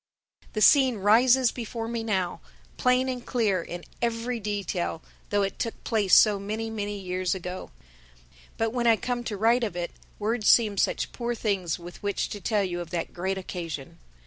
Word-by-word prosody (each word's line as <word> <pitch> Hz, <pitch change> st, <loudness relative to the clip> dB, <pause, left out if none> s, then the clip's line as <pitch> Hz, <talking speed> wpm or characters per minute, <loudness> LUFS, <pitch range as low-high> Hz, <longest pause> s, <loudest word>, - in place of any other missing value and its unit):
The 215 Hz, -, -2 dB
scene 265 Hz, -5 st, +6 dB
rises 240 Hz, +5 st, +5 dB
before 230 Hz, -1 st, -5 dB
me 230 Hz, -1 st, -3 dB
now, 190 Hz, -5 st, -1 dB, 0.3 s
plain 250 Hz, +1 st, +2 dB
and 250 Hz, -2 st, -3 dB
clear 215 Hz, -9 st, +1 dB
in 175 Hz, +1 st, -7 dB, 0.2 s
every 235 Hz, +1 st, -1 dB
detail, 200 Hz, -6 st, -3 dB, 0.3 s
though 205 Hz, -1 st, +2 dB
it 195 Hz, -, -3 dB
took 230 Hz, -, -4 dB
place 210 Hz, -4 st, +3 dB
so 210 Hz, -2 st, +6 dB
many, 220 Hz, +3 st, -4 dB
many 205 Hz, -1 st, -3 dB
years 185 Hz, -1 st, -1 dB
ago. 180 Hz, 0 st, -6 dB, 0.9 s
But 225 Hz, 0 st, 0 dB
when 240 Hz, -1 st, +1 dB
I 230 Hz, -, +7 dB
come 245 Hz, +2 st, -3 dB
to 210 Hz, -4 st, -3 dB
write 230 Hz, +4 st, +3 dB
of 210 Hz, -6 st, -2 dB
it, 175 Hz, -1 st, -3 dB, 0.3 s
words 215 Hz, +1 st, -1 dB
seem 210 Hz, -4 st, +5 dB
such -, -, 0 dB
poor 240 Hz, 0 st, -3 dB
things 195 Hz, -7 st, -1 dB
with 175 Hz, 0 st, -11 dB
which 205 Hz, -1 st, -1 dB
to 205 Hz, -, -6 dB
tell 210 Hz, -2 st, +1 dB
you 175 Hz, -2 st, -3 dB
of 170 Hz, -, -7 dB
that 170 Hz, -1 st, -3 dB
great 190 Hz, +2 st, -2 dB
occasion. 170 Hz, -4 st, -6 dB
210 Hz, 180 wpm, -27 LUFS, 185-235 Hz, 0.9 s, I